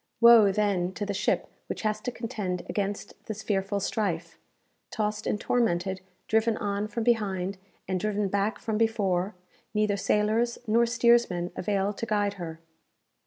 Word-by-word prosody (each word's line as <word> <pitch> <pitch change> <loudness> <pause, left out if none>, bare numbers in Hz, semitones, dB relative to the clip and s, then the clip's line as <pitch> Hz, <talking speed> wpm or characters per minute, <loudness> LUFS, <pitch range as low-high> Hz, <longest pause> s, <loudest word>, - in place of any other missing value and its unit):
Woe, 235 -4 +8
then, 190 -3 0
to 205 - -3
the 200 - -2
ship 200 - +1 0.2
which - - -5
has 215 0 0
to 250 - -3
contend 215 -7 -3
against 200 0 -3
this 220 0 -5
fearful 200 0 0
strife! 170 -5 -2 0.5
Tossed 210 -1 -2
and 210 - 0
tormented, 190 -6 0 0.3
driven 220 0 +2
on 205 0 -2
from 225 +2 -3
behind, 195 -5 0 0.3
and 185 -1 0
driven 210 +1 0
back 200 +2 0
from 220 -1 -2
before, 200 -4 +1 0.4
neither 210 -1 +2
sailors 215 +4 +1
nor 235 +1 +3
steersmen 235 -7 +3
avail 200 +1 0
to 230 - -4
guide 205 -1 +1
her. 160 -1 -6
210 Hz, 150 wpm, -27 LUFS, 195-220 Hz, 0.5 s, Woe